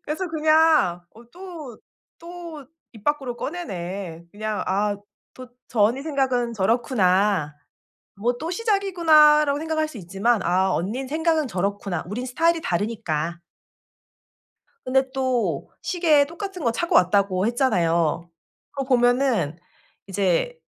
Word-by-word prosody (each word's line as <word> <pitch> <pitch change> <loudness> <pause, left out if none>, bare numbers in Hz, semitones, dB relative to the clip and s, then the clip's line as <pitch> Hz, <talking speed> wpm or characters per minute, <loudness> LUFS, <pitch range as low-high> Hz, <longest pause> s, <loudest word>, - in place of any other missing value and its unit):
그래서 335 +5 -3
그냥 310 - +3
'어 230 +2 -15
또 340 - -9 0.4
또 335 -5 -9 0.3
입 220 -3 -15
밖으로 275 -5 -1
꺼내네.' 185 - -6
그냥 215 0 -3
'아 205 +2 0 0.4
또 255 -1 -11 0.2
저 225 - -2
언니 235 +6 +2
생각은 260 -6 -1
저렇구나. 195 - +1 0.6
뭐 240 +5 -1
또 325 +6 -4
시작이구나.'라고 330 -8 +4
생각할 315 -1 -1
수 305 - -10
있지만 200 +4 0
'아 190 +2 +2
언니 225 +10 -3
생각은 315 +1 0
저렇구나. 195 -3 -2
우린 230 +7 -4
스타일이 330 +6 +1
다르니까.' 170 - -2 1.5
근데 265 +1 +3
또 260 -3 -1
시계 320 -6 +3
똑같은 360 +2 -7
거 235 - +2
차고 340 +9 -1
왔다고 190 +1 +3
했잖아요. 170 - +1 0.4
그거 275 -2 -4
보면은 245 - +2 0.5
이제 195 - 0
245 Hz, 260 characters per minute, -23 LUFS, 195-310 Hz, 1.5 s, 시작이구나.'라고